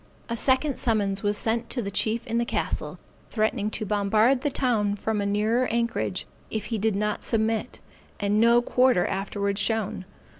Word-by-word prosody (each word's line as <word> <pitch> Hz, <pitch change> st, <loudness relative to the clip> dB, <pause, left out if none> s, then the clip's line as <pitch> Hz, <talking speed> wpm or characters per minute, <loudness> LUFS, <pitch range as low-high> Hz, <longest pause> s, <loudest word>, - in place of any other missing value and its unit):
A 235 Hz, -, -1 dB
second 260 Hz, +3 st, +1 dB
summons 205 Hz, -4 st, 0 dB
was 205 Hz, 0 st, +1 dB
sent 225 Hz, +1 st, -1 dB
to 255 Hz, -, -3 dB
the 200 Hz, -4 st, -3 dB
chief 220 Hz, +3 st, +1 dB
in 230 Hz, -1 st, -1 dB
the -, -, +2 dB
castle, -, -, -3 dB, 0.3 s
threatening 215 Hz, -1 st, 0 dB
to 215 Hz, 0 st, -4 dB
bombard 215 Hz, +5 st, +2 dB
the 290 Hz, -, 0 dB
town 225 Hz, -7 st, 0 dB
from 210 Hz, +1 st, -2 dB
a 200 Hz, -, -1 dB
nearer 220 Hz, +5 st, +1 dB
anchorage 235 Hz, 0 st, -1 dB, 0.2 s
if 220 Hz, -, -3 dB
he 220 Hz, -, 0 dB
did 215 Hz, 0 st, +1 dB
not 210 Hz, +1 st, -1 dB
submit, 225 Hz, +1 st, -1 dB, 0.4 s
and 205 Hz, +1 st, +1 dB
no 235 Hz, +1 st, +5 dB
quarter 250 Hz, -7 st, +3 dB
afterwards 200 Hz, +1 st, -2 dB
shown. 220 Hz, -4 st, -1 dB
220 Hz, 175 wpm, -26 LUFS, 205-235 Hz, 0.4 s, no